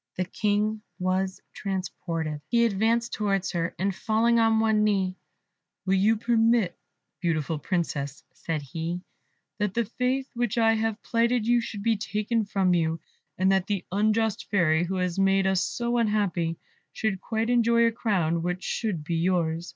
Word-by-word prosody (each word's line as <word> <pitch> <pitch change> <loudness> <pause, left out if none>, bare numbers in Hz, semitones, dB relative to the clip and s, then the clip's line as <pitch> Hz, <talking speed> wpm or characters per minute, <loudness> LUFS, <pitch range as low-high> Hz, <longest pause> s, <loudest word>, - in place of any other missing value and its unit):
The 185 - 0
King 210 +2 0 0.2
was 185 +1 -1
transported: 165 -5 -4
he 235 -1 +3
advanced 230 +3 +1
towards 195 -3 0
her, 170 0 -2
and 195 +1 0
falling 230 +4 +2
on 225 -1 +4
one 220 -1 +3
knee 195 -3 +1 0.7
"Will 190 - +2
you 205 +4 +3
permit, 225 -4 +2 0.4
beautiful 160 -3 -1
Princess," 150 -5 -2
said 160 -3 -4
he, 165 +5 -4 0.6
"that 205 -2 -1
the 235 -1 +1
faith 255 +4 -1
which 240 -2 -1
I 225 -1 +4
have 225 -1 -1
plighted 235 0 +1
you 240 +1 +3
should 210 -3 -6
be 225 -1 +2
taken 215 +1 -1
from 195 -2 +1
you, 165 -1 +1 0.4
and 190 +1 +3
that 190 -1 +1
the 200 -3 -2
unjust 215 +2 +1
Fairy, 175 -4 +3
who 190 +2 -3
has 180 0 -1
made 195 0 +3
us 190 -1 +2
so 240 0 -1
unhappy, 195 -7 0 0.3
should 210 -4 -2
quietly 225 +2 -1
enjoy 235 -1 +4
a 230 - +3
crown 175 -8 0
which 180 +2 -3
should 200 -9 -2
be 165 +2 -2
yours?" 170 -1 0
200 Hz, 160 wpm, -26 LUFS, 180-225 Hz, 0.7 s, on